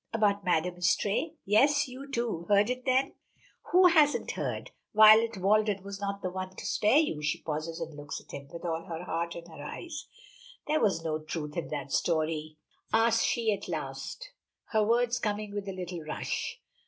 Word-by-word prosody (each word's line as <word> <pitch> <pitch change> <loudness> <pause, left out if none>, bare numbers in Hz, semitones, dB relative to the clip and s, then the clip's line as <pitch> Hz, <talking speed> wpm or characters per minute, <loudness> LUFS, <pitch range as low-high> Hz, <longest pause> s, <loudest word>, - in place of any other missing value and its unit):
"About 205 -2 +2
Madame 180 0 +1
Istray?" 205 - +1
"Yes. 275 +9 +4
You, 265 +2 -9
too, 235 -10 -2
heard 205 +3 +4
of 250 - -1
it 255 - -26
then?" 260 +1 +2 0.6
"Who 365 +1 +6
hasn't 310 -4 +4
heard. - - -4 0.2
Violet 220 +1 +7
Walden 205 +1 +2
was 200 0 -7
not 200 0 -3
the 185 - -2
one 185 0 -5
to - - -8
spare 215 +7 +3
you." 300 - +1
She 150 - -1
pauses 155 +1 -4
and 155 - -6
looks 145 -1 -6
at - - -16
him, 140 0 -8
with 170 +1 -8
all 165 -1 -2
her 165 0 -5
heart 170 0 -3
in 170 - -8
her 160 -4 -10
eyes. 310 - -7 0.6
"Was 215 - +2
there 160 - -2
no 155 - -1
truth 155 -1 -5
in 170 - -3
that 140 -2 -5
story?" 155 -1 0 0.3
asks 225 0 +4
she 225 -3 +1
at 200 0 -6
last, 150 - -5 0.4
her 220 -1 +3
words 235 +2 +2
coming 210 -1 -2
with 205 -1 -4
a - - -2
little 180 -2 -5
rush. 155 0 -4
200 Hz, 190 wpm, -29 LUFS, 165-230 Hz, 0.6 s, Violet